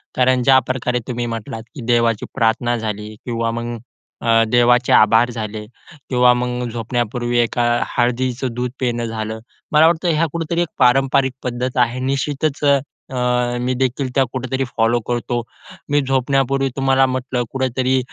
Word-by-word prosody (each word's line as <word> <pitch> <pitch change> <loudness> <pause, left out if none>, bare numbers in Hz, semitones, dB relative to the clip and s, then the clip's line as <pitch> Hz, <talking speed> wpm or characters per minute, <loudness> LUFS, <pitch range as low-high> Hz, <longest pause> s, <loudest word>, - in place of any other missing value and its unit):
कारण 130 0 +3
ज्याप्रकारे 130 -1 +2
तुम्ही 120 -1 -3
म्हटलात 115 -1 -5
की 140 - -7
देवाची 115 -2 +2
प्रार्थना 120 0 +1
झाली 105 -1 -5
किंवा 115 -1 -1
मग 120 +1 -4 0.5
अ, 115 -1 +4
देवाचे 120 +1 +3
आभार 115 +3 +5
झाले 110 -2 -5 0.4
किंवा 125 -1 +5
मग 125 0 -2
झोपण्यापूर्वी 120 +1 -2
एका 120 +1 +1 0.3
हळदीचं 125 +1 0
दूध 125 +1 -3
पिणं 120 -2 -1
झालं. 110 -1 -4 0.3
मला 155 +2 +6
वाटतं 170 +1 +1
ह्या 160 +2 +2
कुठेतरी 170 +1 -1
एक 175 - 0
पारंपरिक 135 +1 +3
पद्धत 125 +1 -3
आहे. 120 +2 -6
निश्चितच 140 +2 -1
अ, 140 -1 +5 0.4
अ, 125 -1 0
मी 125 +1 0
देखील 130 +1 -1
त्या 135 - +4
कुठेतरी 130 +1 -2
फॉलो 115 +1 +3
करतो. 120 0 -1 0.5
मी 145 0 +3
झोपण्यापूर्वी 135 0 +1
तुम्हाला 135 -1 +3
म्हटलं 130 -1 -2
कुठेतरी 130 0 0
125 Hz, 145 wpm, -19 LUFS, 120-130 Hz, 0.5 s, मला